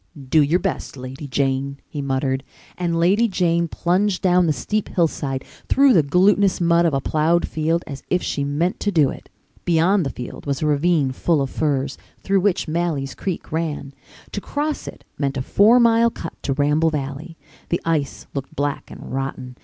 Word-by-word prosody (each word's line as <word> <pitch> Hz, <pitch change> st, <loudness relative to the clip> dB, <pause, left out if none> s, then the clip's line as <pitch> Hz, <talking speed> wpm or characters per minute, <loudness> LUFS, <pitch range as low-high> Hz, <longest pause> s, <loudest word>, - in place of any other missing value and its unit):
"Do 155 Hz, +4 st, +4 dB
your 150 Hz, +4 st, +3 dB
best, 180 Hz, -7 st, -3 dB
Lady 130 Hz, +3 st, -7 dB
Jane," 135 Hz, 0 st, -1 dB
he 145 Hz, -, -5 dB
muttered, 135 Hz, -1 st, -1 dB, 0.3 s
and 170 Hz, -2 st, -1 dB
Lady 200 Hz, +7 st, +4 dB
Jane 170 Hz, -4 st, +1 dB
plunged 185 Hz, +4 st, 0 dB
down 180 Hz, -1 st, +4 dB
the -, -, +3 dB
steep 210 Hz, +10 st, -2 dB
hillside, 140 Hz, -6 st, -1 dB, 0.2 s
through 275 Hz, -1 st, +5 dB
the 170 Hz, -, +6 dB
glutinous 190 Hz, +6 st, +3 dB
mud 170 Hz, 0 st, +3 dB
of 155 Hz, -, 0 dB
a -, -, +2 dB
ploughed 160 Hz, +5 st, +1 dB
field 160 Hz, +2 st, 0 dB
as 140 Hz, -2 st, -7 dB
if 180 Hz, -, +1 dB
she 140 Hz, -, -2 dB
meant 150 Hz, +6 st, -1 dB
to 205 Hz, -, 0 dB
do 155 Hz, -7 st, +3 dB
it. -, -, -11 dB, 0.3 s
Beyond 175 Hz, +3 st, +3 dB
the 140 Hz, -, -2 dB
field 125 Hz, +3 st, -8 dB
was 140 Hz, +1 st, -1 dB
a -, -, +1 dB
ravine 150 Hz, -1 st, +2 dB
full 155 Hz, +4 st, +1 dB
of 135 Hz, -1 st, -2 dB
firs, 140 Hz, -3 st, -1 dB, 0.2 s
through 195 Hz, 0 st, +2 dB
which 190 Hz, -2 st, +1 dB
Malley's 155 Hz, -4 st, -1 dB
Creek 185 Hz, -4 st, -5 dB
ran. 155 Hz, -3 st, -3 dB, 0.4 s
To -, -, -4 dB
cross 300 Hz, +1 st, -3 dB
it -, -, -9 dB, 0.2 s
meant 140 Hz, -1 st, -1 dB
a 130 Hz, -, -2 dB
four 220 Hz, -, +5 dB
mile 230 Hz, 0 st, +5 dB
cut 165 Hz, -7 st, -7 dB
to 135 Hz, -, -1 dB
Ramble 150 Hz, +3 st, +2 dB
Valley. 150 Hz, +2 st, -5 dB, 0.3 s
The 170 Hz, -, +1 dB
ice 155 Hz, -4 st, -1 dB
looked 135 Hz, -1 st, -5 dB
black 145 Hz, 0 st, -2 dB
and -, -, -9 dB
rotten. 130 Hz, -2 st, -4 dB
160 Hz, 185 wpm, -21 LUFS, 140-180 Hz, 0.4 s, the